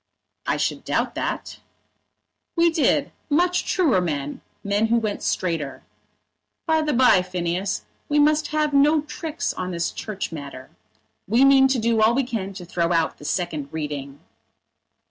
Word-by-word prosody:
"I - - +1
should - - -1
doubt - - -1
that." - - -4 1.0
"We 335 -1 +4
did; 320 -2 +2 0.2
much 355 +4 +2
truer 295 - +2
men, 145 -4 -3 0.2
men 205 +2 +1
who 235 +1 +3
went 215 -3 -2
straighter. 165 -7 -2 0.8
By 320 -1 +2
the 305 -1 0
bye, 250 -7 +5
Phineas, 180 +1 -2 0.2
we 295 - +2
must 300 +1 +3
have 305 -1 0
no 295 +2 +4
tricks 320 +2 -4
on 185 - -4
this 170 -2 -2
Church 205 -5 -5
matter. 140 -4 -8 0.6
We 235 +7 +4
mean 270 -1 +6
to 265 -1 +1
do 230 -1 +1
all 220 +2 +4
we 275 - +2
can 215 -6 -4
to 185 -2 -8
throw 170 0 -1
out 165 -2 +1
the 145 - -11
second 155 -5 -2
reading." 145 -3 -5
215 Hz, 155 wpm, -23 LUFS, -, 1.0 s, mean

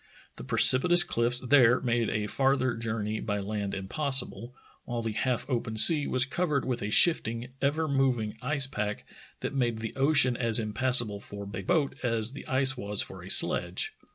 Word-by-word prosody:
The - - -10
precipitous 175 +7 +5
cliffs 120 +1 -2
there 125 -2 +3
made 120 -2 -2
a 105 -1 -3
farther 130 +2 -1
journey 110 -1 -5
by 105 -2 -4
land 100 0 -5
impossible, 125 +2 0 0.3
while 120 -1 -5
the 115 - -3
half 125 +3 -3
open 115 -4 -4
sea 145 +7 +7
was 130 0 +1
covered 150 0 -3
with 125 -2 -4
a 105 - -5
shifting, 120 -3 +1
ever 155 +3 -1
moving 130 -6 -2
ice 140 +1 +1
pack 105 -5 -6 0.4
that - - -5
made 120 -4 -2
the 110 0 -8
ocean 135 -2 +2
as 115 -2 +2
impassa 120 +3 +3
ble 105 -1 -8
for 100 0 -10
a 100 -1 -8
boat 160 -6 -1
as 115 -2 -1
the 140 - -12
ice 135 0 +2
was 105 -4 0
for - - -12
a - - -12
sledge. - - +1
120 Hz, 180 wpm, -26 LUFS, 110-135 Hz, 0.4 s, sea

